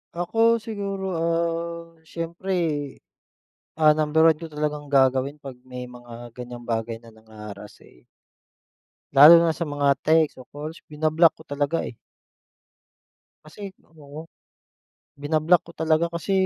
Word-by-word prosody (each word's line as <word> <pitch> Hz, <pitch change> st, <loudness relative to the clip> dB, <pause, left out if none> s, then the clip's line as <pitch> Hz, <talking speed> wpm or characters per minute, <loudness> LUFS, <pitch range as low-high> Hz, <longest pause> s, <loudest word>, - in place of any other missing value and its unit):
Ako, 225 Hz, +7 st, +2 dB
siguro, 200 Hz, -3 st, -5 dB
ah, 170 Hz, 0 st, -2 dB
siyempre, 170 Hz, +4 st, -5 dB, 1.3 s
ah, 155 Hz, -1 st, +5 dB
number 155 Hz, +1 st, +3 dB
1 160 Hz, -, +3 dB
ko 165 Hz, -, -10 dB
talagang 150 Hz, -1 st, -4 dB
gagawin 135 Hz, +2 st, +2 dB
pag 135 Hz, -3 st, -9 dB
may 125 Hz, -1 st, -8 dB
mga 120 Hz, -1 st, -12 dB
ganyang 120 Hz, -1 st, -9 dB
bagay 115 Hz, 0 st, -3 dB
na 115 Hz, -, -17 dB
nangha-harass 105 Hz, -2 st, -12 dB
eh -, -, -21 dB, 1.1 s
lalo 155 Hz, +5 st, +10 dB
na 165 Hz, -1 st, +1 dB
sa -, -, -3 dB
mga 145 Hz, -2 st, +1 dB
text 160 Hz, -1 st, +3 dB
o 130 Hz, -, -12 dB
calls 155 Hz, +3 st, -8 dB
binablock 155 Hz, +2 st, +3 dB
ko -, -, -13 dB
talaga 145 Hz, +3 st, -1 dB
eh. -, -, -9 dB, 1.5 s
Kasi 195 Hz, +6 st, -9 dB, 0.3 s
oo. 150 Hz, +2 st, -10 dB, 0.9 s
Binablock 155 Hz, +4 st, +2 dB
ko -, -, -11 dB
talaga 160 Hz, +1 st, +1 dB
kasi 170 Hz, +2 st, -5 dB
150 Hz, 130 wpm, -24 LUFS, 130-165 Hz, 1.5 s, lalo